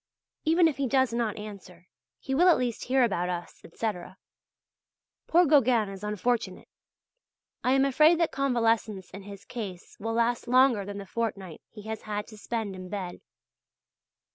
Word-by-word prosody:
Even 330 Hz, +2 st, +5 dB
if 305 Hz, -, -2 dB
he 275 Hz, -1 st, 0 dB
does 260 Hz, -1 st, +2 dB
not 235 Hz, -3 st, -1 dB
answer, 195 Hz, -4 st, -10 dB, 0.3 s
he 270 Hz, -, -5 dB
will 350 Hz, +7 st, +5 dB
at 345 Hz, -, +6 dB
least 245 Hz, -3 st, -2 dB
hear 260 Hz, +1 st, +3 dB
about 180 Hz, -6 st, 0 dB
us, 175 Hz, -1 st, -6 dB
etc. 185 Hz, -1 st, -5 dB, 1.1 s
Poor 350 Hz, +2 st, +5 dB
Gauguin 250 Hz, -8 st, +4 dB
is 195 Hz, 0 st, -9 dB
unfortunate; 210 Hz, -1 st, -2 dB, 1.0 s
I 255 Hz, +1 st, +3 dB
am 270 Hz, 0 st, +4 dB
afraid 305 Hz, +5 st, +5 dB
that 335 Hz, -, +2 dB
convalescence 230 Hz, -7 st, 0 dB
in 195 Hz, -, -9 dB
his 200 Hz, 0 st, -11 dB
case 195 Hz, -7 st, -7 dB
will 225 Hz, +2 st, -3 dB
last 235 Hz, +1 st, 0 dB
longer 250 Hz, -4 st, +4 dB
than 200 Hz, 0 st, -6 dB
the 200 Hz, -, -7 dB
fortnight 195 Hz, -5 st, -4 dB
he 210 Hz, -2 st, -12 dB
has 220 Hz, 0 st, -5 dB
had 210 Hz, -1 st, -4 dB
to 215 Hz, -, -12 dB
spend 220 Hz, -4 st, -3 dB
in 185 Hz, 0 st, -9 dB
bed. 190 Hz, -3 st, -5 dB
225 Hz, 165 wpm, -28 LUFS, 200-255 Hz, 1.1 s, at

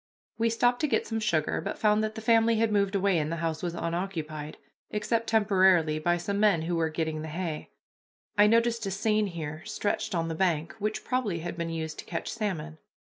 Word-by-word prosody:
We 230 Hz, +1 st, +3 dB
stopped 245 Hz, +2 st, +2 dB
to 305 Hz, -, +2 dB
get -, -, +1 dB
some 225 Hz, -1 st, -2 dB
sugar, 170 Hz, -8 st, 0 dB
but -, -, -4 dB
found 215 Hz, 0 st, +3 dB
that 215 Hz, 0 st, -2 dB
the 220 Hz, -, -6 dB
family 225 Hz, 0 st, +4 dB
had 225 Hz, 0 st, +2 dB
moved 200 Hz, -1 st, +1 dB
away, 195 Hz, -3 st, +2 dB
and 155 Hz, +1 st, -2 dB
the -, -, -1 dB
house 165 Hz, -1 st, -2 dB
was 175 Hz, -1 st, -3 dB
unoccupied, 165 Hz, -3 st, -4 dB, 0.3 s
except 225 Hz, +2 st, -1 dB
temporarily 190 Hz, -7 st, +4 dB
by 175 Hz, +2 st, +2 dB
some 200 Hz, +4 st, -2 dB
men 205 Hz, -7 st, +4 dB
who 170 Hz, +1 st, -1 dB
were 165 Hz, -1 st, +1 dB
getting 155 Hz, -1 st, -2 dB
the 160 Hz, -, -5 dB
hay. 160 Hz, -1 st, -4 dB, 0.7 s
I 205 Hz, 0 st, +6 dB
noticed 230 Hz, +1 st, +2 dB
a -, -, 0 dB
seine 210 Hz, +2 st, +1 dB
here 160 Hz, -2 st, -6 dB
stretched 205 Hz, -1 st, -2 dB
on 165 Hz, -1 st, 0 dB
the 165 Hz, -, -2 dB
bank, 160 Hz, -2 st, 0 dB
which 215 Hz, +1 st, -2 dB
probably 220 Hz, -10 st, -1 dB
had 175 Hz, +1 st, -4 dB
been 170 Hz, -1 st, -3 dB
used 160 Hz, -1 st, -4 dB
to -, -, -7 dB
catch -, -, -4 dB
salmon. 165 Hz, -8 st, -3 dB
185 Hz, 210 wpm, -28 LUFS, 160-215 Hz, 0.7 s, I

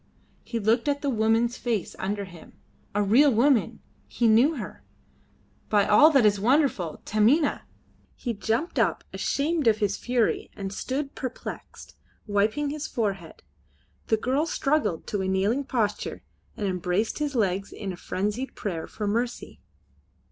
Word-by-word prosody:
He 235 Hz, -, -4 dB
looked 225 Hz, +5 st, +2 dB
at 285 Hz, 0 st, 0 dB
the 280 Hz, -, +1 dB
woman's 225 Hz, +1 st, +2 dB
face 230 Hz, -6 st, -2 dB
under 200 Hz, +1 st, -2 dB
him. 175 Hz, -3 st, -14 dB, 0.4 s
A 205 Hz, -, +2 dB
real 260 Hz, +8 st, +5 dB
woman! 245 Hz, +1 st, +2 dB, 0.3 s
He 235 Hz, -, +1 dB
knew 240 Hz, +9 st, +5 dB
her. 235 Hz, -, -7 dB, 0.9 s
By 205 Hz, -2 st, +4 dB
all 255 Hz, +9 st, +7 dB
that 275 Hz, -7 st, +4 dB
is 205 Hz, -1 st, +3 dB
wonderful! 235 Hz, -, +1 dB
Taminah! 245 Hz, +9 st, +2 dB, 0.5 s
He 240 Hz, -, -3 dB
jumped 225 Hz, -, -1 dB
up -, -, +1 dB
ashamed 300 Hz, -1 st, 0 dB
of 215 Hz, -1 st, +5 dB
his 205 Hz, -2 st, 0 dB
fury 245 Hz, -2 st, 0 dB
and 195 Hz, -1 st, -5 dB
stood 275 Hz, +6 st, -3 dB
perplexed, 255 Hz, -2 st, -7 dB, 0.3 s
wiping 215 Hz, +8 st, 0 dB
his 305 Hz, +1 st, -4 dB
forehead. 195 Hz, -8 st, -3 dB, 0.6 s
The 220 Hz, -, +3 dB
girl 265 Hz, +8 st, 0 dB
struggled 295 Hz, -, 0 dB
to 205 Hz, -, -2 dB
a 190 Hz, -, -1 dB
kneeling 200 Hz, +9 st, +1 dB
posture 220 Hz, -6 st, -2 dB, 0.3 s
and 210 Hz, -, -2 dB
embraced 185 Hz, -, -1 dB
his 295 Hz, -2 st, -2 dB
legs 195 Hz, -3 st, 0 dB
in 195 Hz, -3 st, -5 dB
a -, -, -7 dB
frenzied 210 Hz, +8 st, -3 dB
prayer 170 Hz, -6 st, -4 dB
for 210 Hz, -, -5 dB
mercy. 235 Hz, +4 st, -2 dB
225 Hz, 150 wpm, -26 LUFS, 200-270 Hz, 0.9 s, all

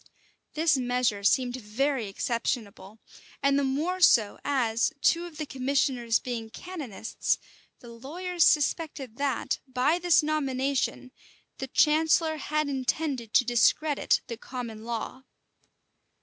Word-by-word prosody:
This 310 Hz, -2 st, +3 dB
measure 245 Hz, -5 st, 0 dB
seemed 250 Hz, +3 st, +2 dB
very 250 Hz, +2 st, -1 dB
exceptionable; 215 Hz, -1 st, -3 dB, 0.5 s
and 275 Hz, 0 st, +3 dB
the -, -, 0 dB
more 305 Hz, +8 st, -1 dB
so, 220 Hz, -, +5 dB
as, 240 Hz, -3 st, +1 dB
two 335 Hz, +4 st, +2 dB
of 320 Hz, -3 st, -13 dB
the 310 Hz, -, -3 dB
commissioners 260 Hz, -4 st, 0 dB
being 235 Hz, -3 st, -5 dB
canonists, 265 Hz, -, -3 dB, 0.4 s
the 240 Hz, -, -12 dB
lawyers 335 Hz, +9 st, -2 dB
suspected 290 Hz, -5 st, +1 dB
that, 280 Hz, -3 st, -1 dB
by 260 Hz, +6 st, +1 dB
this 350 Hz, -2 st, +4 dB
nomination, 275 Hz, -3 st, -1 dB, 0.5 s
the 265 Hz, -, -4 dB
chancellor 315 Hz, +3 st, +3 dB
had 305 Hz, +1 st, -1 dB
intended 265 Hz, -3 st, -2 dB
to 250 Hz, -, +5 dB
discredit 280 Hz, +5 st, +2 dB
the 235 Hz, -2 st, -6 dB
common 230 Hz, -3 st, -7 dB
law. 235 Hz, +2 st, -5 dB
265 Hz, 120 wpm, -27 LUFS, 235-305 Hz, 0.5 s, so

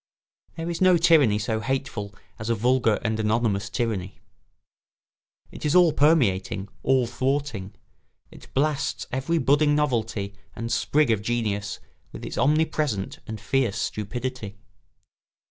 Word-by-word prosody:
There 165 Hz, 0 st, -5 dB
is 170 Hz, 0 st, -4 dB
no 185 Hz, -1 st, +6 dB
tyranny 160 Hz, -10 st, +5 dB
so 110 Hz, +1 st, -1 dB
hateful 115 Hz, -4 st, -3 dB, 0.2 s
as 110 Hz, +1 st, -4 dB
a 115 Hz, -, +2 dB
vulgar 120 Hz, 0 st, +2 dB
and 110 Hz, -1 st, -1 dB
anonymous 105 Hz, -2 st, 0 dB
tyranny. 100 Hz, -5 st, -3 dB, 1.3 s
It -, -, -10 dB
is 150 Hz, +3 st, +1 dB
all 175 Hz, -4 st, +6 dB
permeating, 100 Hz, -, +2 dB
all 130 Hz, -2 st, +3 dB
thwarting; 130 Hz, -6 st, -2 dB, 0.6 s
it -, -, -15 dB
blasts 145 Hz, +1 st, 0 dB
every 135 Hz, +6 st, 0 dB
budding 145 Hz, 0 st, +3 dB
novelty 110 Hz, -8 st, -1 dB, 0.2 s
and 115 Hz, +1 st, -4 dB
sprig 150 Hz, -4 st, +2 dB
of 110 Hz, -2 st, +1 dB
genius 105 Hz, -3 st, -2 dB, 0.3 s
with -, -, -8 dB
its -, -, -6 dB
omnipresent 150 Hz, -8 st, 0 dB
and 110 Hz, -1 st, -6 dB
fierce 120 Hz, -2 st, 0 dB
stupidity. 115 Hz, -1 st, -4 dB
120 Hz, 130 wpm, -25 LUFS, 105-145 Hz, 1.3 s, no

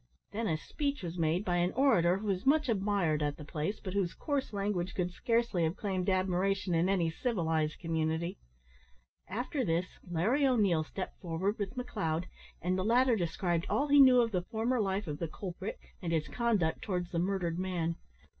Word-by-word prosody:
Then 225 Hz, +2 st, -2 dB
a 160 Hz, -, +1 dB
speech 285 Hz, -, -3 dB
was 175 Hz, 0 st, -5 dB
made 165 Hz, +5 st, +1 dB
by 175 Hz, -1 st, +1 dB
an 175 Hz, +1 st, +1 dB
orator 190 Hz, -10 st, +4 dB
who 210 Hz, -, -6 dB
was 195 Hz, -2 st, -1 dB
much 295 Hz, 0 st, +3 dB
admired 195 Hz, -7 st, +1 dB
at 145 Hz, -1 st, -1 dB
the 150 Hz, -, -9 dB
place, 155 Hz, +8 st, -3 dB
but 185 Hz, -, -6 dB
whose 195 Hz, -4 st, 0 dB
coarse 285 Hz, -3 st, -2 dB
language 195 Hz, -3 st, -2 dB
would 180 Hz, -1 st, 0 dB
scarcely 230 Hz, -3 st, +1 dB
have 160 Hz, +2 st, 0 dB
claimed 190 Hz, -3 st, -1 dB
admiration 185 Hz, 0 st, +1 dB
in 170 Hz, +3 st, +2 dB
any 175 Hz, -4 st, +2 dB
civilised 160 Hz, -7 st, 0 dB
community. 165 Hz, +1 st, -1 dB, 0.9 s
After 245 Hz, -, -2 dB
this 170 Hz, -2 st, +1 dB, 0.2 s
Larry 215 Hz, -, +1 dB
O'Neil 200 Hz, -11 st, +3 dB
stepped 185 Hz, +4 st, -7 dB
forward 185 Hz, +4 st, -1 dB
with 200 Hz, +3 st, -3 dB
McLeod, 180 Hz, -10 st, -2 dB, 0.4 s
and 185 Hz, +2 st, +1 dB
the -, -, 0 dB
latter 240 Hz, +3 st, +4 dB
described 175 Hz, -1 st, -1 dB
all 285 Hz, +2 st, +1 dB
he 285 Hz, 0 st, +6 dB
knew 255 Hz, -2 st, +8 dB
of 230 Hz, -1 st, 0 dB
the 180 Hz, -3 st, 0 dB
former 225 Hz, +5 st, 0 dB
life 195 Hz, 0 st, -1 dB
of 150 Hz, -3 st, -5 dB
the 170 Hz, -, -2 dB
culprit, 185 Hz, +4 st, -6 dB, 0.2 s
and 170 Hz, -3 st, -2 dB
his 160 Hz, -2 st, 0 dB
conduct 215 Hz, -9 st, 0 dB
towards 180 Hz, -4 st, -2 dB
the 170 Hz, -, 0 dB
murdered 180 Hz, -2 st, -1 dB
man. 175 Hz, -3 st, -1 dB
185 Hz, 185 wpm, -32 LUFS, 170-220 Hz, 0.9 s, knew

